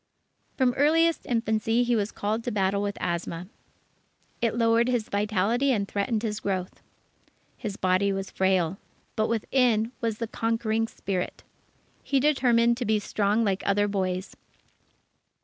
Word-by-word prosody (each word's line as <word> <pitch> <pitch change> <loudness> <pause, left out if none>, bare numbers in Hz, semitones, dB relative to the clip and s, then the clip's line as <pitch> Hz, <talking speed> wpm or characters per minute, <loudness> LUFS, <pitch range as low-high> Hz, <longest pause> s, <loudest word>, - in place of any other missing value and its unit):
From 255 -2 +3
earliest 325 +3 +3
infancy 225 0 +1
he 240 0 +1
was 210 -1 -1
called 215 +3 -2
to 245 - -1
battle 200 -1 +1
with 205 0 -3
asthma. 170 0 -3 1.0
It 230 -2 +1
lowered 230 0 +3
his 245 -4 -1
vitality 210 +6 +1
and 200 -5 0
threatened 215 +3 -1
his 215 -1 -2
growth. 185 -3 -3 0.7
His 210 -4 -5
body 185 +2 +2
was 195 0 -4
frail, 190 -1 +1 0.4
but 215 0 +1
within 230 0 +1
was 225 -2 -1
the 230 - -2
conquering 225 0 -1
spirit. 190 -4 -4 0.6
He 275 - +1
determined 240 -5 +3
to 245 - -3
be 220 0 +2
strong 210 +1 0
like 195 -3 0
other 205 +1 +2
boys. 185 -1 -2
215 Hz, 140 wpm, -26 LUFS, 200-235 Hz, 1.0 s, From